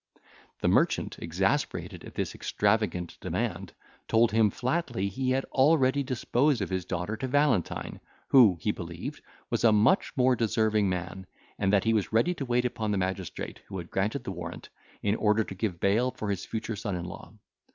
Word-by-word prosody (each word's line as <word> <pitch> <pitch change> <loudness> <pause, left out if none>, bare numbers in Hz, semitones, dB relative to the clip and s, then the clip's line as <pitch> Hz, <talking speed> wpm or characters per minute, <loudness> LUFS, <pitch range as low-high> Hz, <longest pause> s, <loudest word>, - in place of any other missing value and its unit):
The - - +1
merchant, - - +2
exasperated - - -1
at - - -11
this - - -2
extravagant 100 -4 0
demand, - - -3 0.3
told 115 +1 +4
him 110 -1 +4
flatly 125 - -1
he 130 +6 -2
had 130 +1 +1
already 140 -1 +4
disposed 130 +1 +1
of 100 -4 -3
his 95 -2 -2
daughter 90 +4 -3
to 130 - -3
Valentine, 145 - 0 0.3
who, 115 -10 +7
he - - 0
believed, - - -7 0.3
was - - 0
a 115 - +6
much 110 - +3
more 130 0 +4
deserving 110 -3 +1
man, 90 +1 -4 0.3
and 95 -1 +2
that 100 -1 +3
he 115 - +2
was 105 -3 0
ready 115 +11 +3
to 145 -6 -5
wait 125 0 +1
upon 110 -3 -2
the 105 - +1
magistrate 95 -1 -4
who 95 - -6
had 85 -2 -7
granted 105 +8 -1
the - - -4
warrant, 90 -2 -7 0.3
in 100 - +2
order 110 0 +2
to 95 - -8
give 95 -3 -3
bail 110 +7 +2
for 110 -4 -4
his 100 -1 -3
future 110 0 -3
son 100 -2 -3
in 85 -1 -4
law. 90 - -9
110 Hz, 185 wpm, -28 LUFS, 95-125 Hz, 0.3 s, who